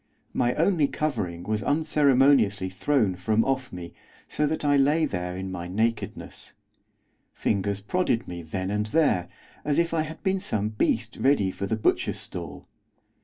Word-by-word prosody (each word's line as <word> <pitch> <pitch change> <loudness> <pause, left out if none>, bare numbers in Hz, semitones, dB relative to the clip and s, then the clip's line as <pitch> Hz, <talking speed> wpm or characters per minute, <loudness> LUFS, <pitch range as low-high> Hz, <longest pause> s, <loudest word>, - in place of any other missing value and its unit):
My 120 0 +1
only 165 -3 +3
covering 100 - -2
was 105 +2 -1
unceremoniously 135 - +3
thrown 105 -2 +1
from 110 +4 +1
off 135 -1 -1
me, 90 -2 -8 0.3
so 150 - 0
that 155 0 -2
I 145 0 +4
lay 145 +4 +3
there 90 -7 -3
in 95 0 -5
my 90 -1 -5
nakedness. 110 +5 -3 0.8
Fingers 100 -1 -1
prodded 125 - 0
me 85 -1 -6
then 95 +4 -4
and 105 +1 -1
there, 140 - +2 0.3
as 145 -1 0
if 170 0 +1
I 160 - +2
had 155 +1 -7
been 190 -1 +1
some 110 - -1
beast 110 +1 -1
ready 130 -9 +2
for 100 - -4
the 110 - 0
butcher's 110 - +1
stall. 80 -5 -8
110 Hz, 160 wpm, -26 LUFS, 95-145 Hz, 0.8 s, I